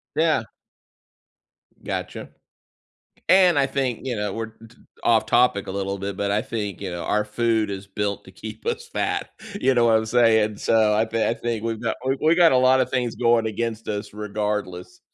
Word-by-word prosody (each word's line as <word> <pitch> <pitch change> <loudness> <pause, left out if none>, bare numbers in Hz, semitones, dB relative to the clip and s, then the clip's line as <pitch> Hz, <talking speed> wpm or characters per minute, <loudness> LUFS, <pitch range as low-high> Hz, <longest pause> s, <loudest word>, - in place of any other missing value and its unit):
Yeah. 155 -7 +2 1.4
Gotcha. - - -5 1.0
And 180 -4 +6
I 135 - +3
think, 130 -4 -2
you 125 -2 -2
know, 105 -1 -2
we're 110 -1 -5
uh, - - -11
t 120 - -22 0.3
off 110 -1 +3
topic 120 -4 +3
a - - -5
little 100 0 -3
bit, 100 0 -4
but 100 0 -1
I 105 +1 +1
think, 105 -4 -4
you 95 -2 -4
know, 85 -1 -5
our 105 0 +1
food 110 -1 0
is 100 0 -6
built 100 0 -3
to - - -13
keep - - -9
us 470 0 -3
fat - - -2 0.3
you 130 0 +3
know 120 -1 +3
what 110 -1 +5
I'm 110 0 0
saying? 110 -3 +3
So 110 -2 +3
I 110 +1 +3
thi 115 0 -1
I 115 - +1
think 115 -2 -3
we've 115 -1 -2
got 115 - -1
we 135 +1 +1
we 160 +2 +4
got 170 -4 +5
a - - +4
lotta 130 0 +4
things 125 -2 -2
going 115 -2 +3
against 115 0 -3
us, 105 -1 -4
regardless. 105 -3 -4
110 Hz, 200 wpm, -23 LUFS, 105-125 Hz, 1.4 s, And